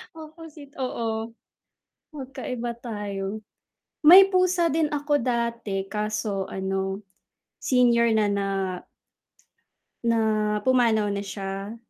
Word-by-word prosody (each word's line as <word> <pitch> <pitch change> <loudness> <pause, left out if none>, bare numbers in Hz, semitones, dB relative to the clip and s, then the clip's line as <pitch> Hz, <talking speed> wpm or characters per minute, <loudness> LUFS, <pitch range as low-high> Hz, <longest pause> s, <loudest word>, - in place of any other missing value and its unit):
Opposite 315 -2 -12
oo. 230 -3 -3 0.8
Magkaiba 255 -4 -5
tayo. 205 -3 -5 0.7
May 380 +4 +10
pusa 365 -2 +2
din 315 +1 +1
ako 290 0 +1
dati 235 -5 -2
kaso 210 -2 -2
ano, 190 0 -3 0.6
senior 240 -2 +3
na 215 -1 +3
na 200 0 -1 1.6
na 215 -2 +1
pumanaw 235 -5 +3
na 200 0 -3
siya. 195 +2 -6
230 Hz, 90 wpm, -25 LUFS, 205-270 Hz, 1.6 s, May